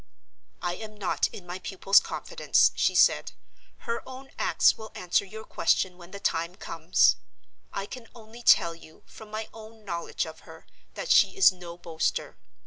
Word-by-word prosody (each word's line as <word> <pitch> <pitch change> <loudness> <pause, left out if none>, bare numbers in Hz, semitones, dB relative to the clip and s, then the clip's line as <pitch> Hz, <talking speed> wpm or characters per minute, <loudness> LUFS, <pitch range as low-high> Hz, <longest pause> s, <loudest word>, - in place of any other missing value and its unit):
"I 175 - -1
am 215 -1 -9
not 195 -3 0
in 185 - -11
my 180 +1 -6
pupil's 195 +1 +4
confidence," - - +1
she - - +1
said. - - +4 0.5
"Her 230 0 -3
own 265 +1 -10
acts - - +4
will 220 -1 -10
answer 180 +2 +1
your 220 +3 -9
question 185 -3 +1
when 175 -1 -14
the 200 - -9
time 170 -2 -1
comes. 165 -2 +2 0.5
I 195 - -4
can 235 +2 -10
only 230 +1 -13
tell 170 -7 +5
you, 160 -1 -16
from 220 - -13
my 215 +1 -5
own 220 -1 -13
knowledge 170 -3 -3
of - - -10
her, - - -14 0.3
that - - -3
she - - +5
is 390 - +7
no 175 -2 -10
boaster. 165 -2 -2
195 Hz, 170 wpm, -27 LUFS, 175-220 Hz, 0.5 s, is